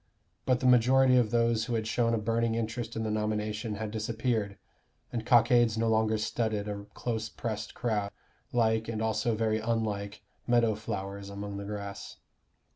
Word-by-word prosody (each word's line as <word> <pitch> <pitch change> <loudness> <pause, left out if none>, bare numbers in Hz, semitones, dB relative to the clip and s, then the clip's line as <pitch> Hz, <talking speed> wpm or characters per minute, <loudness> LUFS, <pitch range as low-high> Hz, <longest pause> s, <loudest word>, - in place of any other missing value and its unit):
But 130 -1 +2
the - - -1
majority 125 +1 +5
of 120 -3 +4
those 115 -1 +2
who 120 -1 -2
had 110 -1 -1
shown 115 +1 +1
a - - 0
burning 115 +1 0
interest 115 +1 -3
in 110 - -2
the 110 - -1
nomination 105 0 -2
had 110 0 -4
disappeared, 110 -1 -1 0.6
and 115 -2 -2
cockades 120 -2 +5
no 115 0 +1
longer 110 0 +2
studded 110 -1 -1
a 100 -1 -5
close 110 -2 -3
pressed 110 -2 -5
crowd, 105 -4 -1 0.4
like, 110 -2 +2
and 115 -1 -3
also 110 +1 0
very 110 0 +1
unlike, 110 -3 -2 0.2
meadow 120 -2 +4
flowers 100 -1 -5
among 100 0 -6
the 100 - -5
grass. 100 -1 -6
110 Hz, 165 wpm, -29 LUFS, 105-115 Hz, 0.6 s, majority